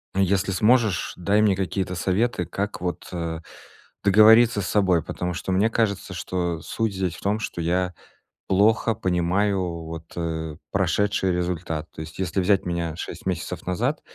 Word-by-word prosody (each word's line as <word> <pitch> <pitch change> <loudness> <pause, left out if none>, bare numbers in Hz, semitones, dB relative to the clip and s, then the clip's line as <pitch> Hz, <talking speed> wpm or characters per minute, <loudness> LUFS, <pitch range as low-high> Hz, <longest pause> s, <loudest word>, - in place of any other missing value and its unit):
если 95 0 +2
сможешь, 110 +1 +2
дай 100 +4 +2
мне 100 -3 +4
какие-то 95 0 -2
советы, 95 +1 0
как 100 +2 -4
вот, 90 -1 -3
э, 85 -2 -3 0.6
договориться 110 +2 +6
с - - -3
собой. 95 -6 +2
Потому 90 0 -3
что 95 - -4
мне 100 +5 +3
кажется, 100 -5 -1
что 85 -1 -2
суть 110 -4 -2
здесь 90 -3 -1
в - - -12
том, 105 +2 0
что 85 -5 -4
я 90 +2 0 0.6
плохо 110 +3 +3
понимаю 90 -2 0
вот, 80 0 -8
э, 80 -2 -3 0.2
прошедший 95 +1 +1
результат. 85 -3 -2
То 80 - -7
есть 80 +2 -10
если 95 +1 0
взять 95 +1 +2
меня 85 -2 -2
6 - - -7
месяцев 90 -1 -3
назад, 120 - 0
95 Hz, 155 wpm, -24 LUFS, 85-105 Hz, 0.6 s, договориться